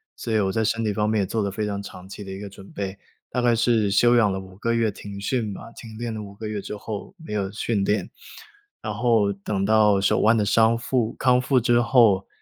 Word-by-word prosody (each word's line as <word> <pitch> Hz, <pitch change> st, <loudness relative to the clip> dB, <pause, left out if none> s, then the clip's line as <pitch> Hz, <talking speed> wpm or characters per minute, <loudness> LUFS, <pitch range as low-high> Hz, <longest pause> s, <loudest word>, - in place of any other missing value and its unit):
所 115 Hz, -, -5 dB
以 110 Hz, -, +3 dB
我 95 Hz, -1 st, +1 dB
在 110 Hz, +2 st, 0 dB
身 115 Hz, +1 st, 0 dB
体 105 Hz, -2 st, 0 dB
方 105 Hz, +1 st, 0 dB
面 110 Hz, -2 st, +1 dB
也 -, -, 0 dB
做 110 Hz, +3 st, -2 dB
了 100 Hz, -, -1 dB
非 105 Hz, +2 st, -3 dB
常 100 Hz, -1 st, -3 dB
长 95 Hz, -2 st, -10 dB
期 100 Hz, +1 st, -8 dB
的 95 Hz, -, -8 dB
一 95 Hz, -, -6 dB
个 105 Hz, -, -7 dB
准 95 Hz, 0 st, -14 dB
备， 100 Hz, -1 st, -5 dB, 0.3 s
大 125 Hz, -, 0 dB
概 120 Hz, -1 st, +3 dB
是 115 Hz, -3 st, +2 dB
休 120 Hz, +4 st, +4 dB
养 110 Hz, -4 st, +4 dB
了 95 Hz, -, -3 dB
5 95 Hz, -1 st, -12 dB
个 115 Hz, +2 st, -1 dB
月， 115 Hz, -2 st, +1 dB
停 100 Hz, 0 st, -9 dB
训 110 Hz, 0 st, -1 dB
嘛， 115 Hz, +4 st, -9 dB
停 110 Hz, -2 st, -11 dB
练 115 Hz, -1 st, -4 dB
了 110 Hz, -, -5 dB
5 100 Hz, -1 st, -9 dB
个 110 Hz, +2 st, -7 dB
月 105 Hz, -1 st, -3 dB
之 105 Hz, -, -6 dB
后 110 Hz, -, -7 dB
没 160 Hz, -10 st, -8 dB
有 100 Hz, -2 st, -2 dB
训 105 Hz, -1 st, -1 dB
练。 105 Hz, +2 st, 0 dB, 0.7 s
然 110 Hz, -2 st, -4 dB
后 110 Hz, -3 st, +2 dB
等 100 Hz, 0 st, -3 dB
到 105 Hz, -2 st, +4 dB
手 100 Hz, -, +2 dB
腕 110 Hz, +1 st, +4 dB
的 105 Hz, -, +1 dB
伤 115 Hz, +2 st, +4 dB
复 115 Hz, -1 st, -1 dB
康 125 Hz, -1 st, +3 dB
复 130 Hz, 0 st, +2 dB
之 120 Hz, 0 st, +3 dB
后， 115 Hz, -6 st, +4 dB
110 Hz, 265 characters per minute, -24 LUFS, 100-115 Hz, 0.7 s, 休